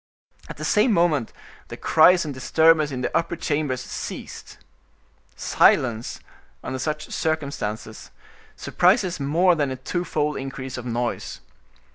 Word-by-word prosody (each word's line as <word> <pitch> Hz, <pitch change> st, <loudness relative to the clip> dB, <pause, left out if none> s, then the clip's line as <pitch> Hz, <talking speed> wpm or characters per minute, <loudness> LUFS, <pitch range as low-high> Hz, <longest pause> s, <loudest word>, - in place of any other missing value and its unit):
At -, -, -8 dB
the -, -, -5 dB
same 215 Hz, +3 st, +3 dB
moment 160 Hz, -, +1 dB, 0.4 s
the -, -, -8 dB
cries 170 Hz, +2 st, +5 dB
and 145 Hz, -, -4 dB
disturbance 155 Hz, +4 st, +3 dB
in 130 Hz, -3 st, -5 dB
the 125 Hz, -, -3 dB
upper 170 Hz, +1 st, 0 dB
chambers 145 Hz, -5 st, -2 dB
ceased. -, -, -8 dB, 0.8 s
Silence, 120 Hz, -2 st, +2 dB, 0.4 s
under 130 Hz, 0 st, -4 dB
such 150 Hz, +2 st, -4 dB
circumstances, 140 Hz, -9 st, -3 dB, 0.5 s
surprises 180 Hz, -1 st, +1 dB
more 165 Hz, +6 st, +3 dB
than 145 Hz, -4 st, 0 dB
a 130 Hz, -, -3 dB
twofold 150 Hz, +1 st, -2 dB
increase 135 Hz, -1 st, -6 dB
of 125 Hz, -1 st, -6 dB
noise. 120 Hz, 0 st, -3 dB
150 Hz, 125 wpm, -23 LUFS, 130-165 Hz, 0.8 s, cries